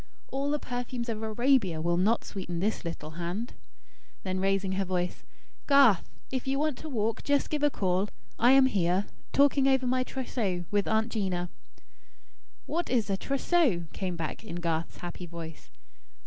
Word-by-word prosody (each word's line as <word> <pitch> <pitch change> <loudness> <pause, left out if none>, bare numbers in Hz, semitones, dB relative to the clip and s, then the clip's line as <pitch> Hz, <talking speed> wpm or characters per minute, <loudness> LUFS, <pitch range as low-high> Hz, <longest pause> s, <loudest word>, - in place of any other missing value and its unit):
'All 275 +1 -1
the 295 - +1
perfumes 245 -2 -4
of 220 -1 -3
Arabia 220 - +2
will 170 +2 +1
not 205 +6 +2
sweeten 175 -3 -4
this 210 +5 -1
little 165 -2 -5
hand.'" 185 +8 -3 0.7
Then, 185 -1 -2
raising 195 0 +1
her 195 +1 0
voice: 180 -1 -2 0.4
"Garth, 275 - +6 0.2
if 260 0 -2
you 270 +1 +1
want 300 -2 0
to 315 - -7
walk, 225 -4 -1
just 285 0 +1
give 300 -1 0
a 295 - +4
call. 190 -4 0 0.3
I 245 +2 +6
am 270 -1 +7
here, 190 -4 +2 0.3
talking 280 -1 +4
over 265 -1 +3
my 255 +1 +2
trousseau 220 -9 -2
with 205 -1 +1
Aunt 220 +1 +2
'Gina." 180 -5 -1 1.1
"What 340 +2 -2
is 225 -5 +1
a - - +2
trousseau?" 275 - +2
came 185 -2 -3
back 165 +4 -4
in 215 -6 -6
Garth's 170 -2 -2
happy 175 0 -6
voice. 165 -1 -9
210 Hz, 165 wpm, -29 LUFS, 180-260 Hz, 1.1 s, am